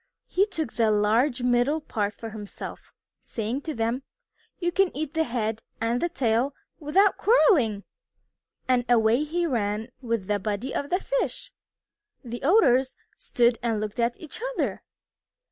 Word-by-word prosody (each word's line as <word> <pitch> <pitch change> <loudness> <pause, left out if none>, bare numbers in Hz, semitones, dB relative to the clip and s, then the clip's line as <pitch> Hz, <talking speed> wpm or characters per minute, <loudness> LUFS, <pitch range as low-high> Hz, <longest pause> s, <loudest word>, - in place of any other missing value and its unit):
He 390 +3 +2
took 320 - -4
the 225 -2 +2
large 230 +5 +2
middle 250 +5 +2
part 210 -8 -2
for 225 -1 -7
himself, 210 -2 -8 0.3
saying 230 +4 -3
to 310 +1 -5
them, 230 +3 -1 0.6
"You 350 -1 -1
can 390 +1 +3
eat 310 -1 -3
the 320 -1 +1
head 225 -2 -2 0.2
and 230 +2 0
the 345 - +1
tail 255 -3 +1 0.2
without 365 +6 +3
quarreling." 285 - +4 0.8
And 250 -1 +3
away 235 +3 +4
he 340 +3 -1
ran 220 -5 -1
with 230 -5 -2
the 205 +1 0
body 210 +6 -3
of 285 - -2
the 365 - +1
fish. - - -2 0.7
The 240 -1 -6
Otters 265 - +4 0.2
stood 235 -1 +1
and 230 -3 0
looked 215 +2 -4
at 235 0 0
each 320 +6 -10
other. - - -1
245 Hz, 150 wpm, -26 LUFS, 225-310 Hz, 0.8 s, quarreling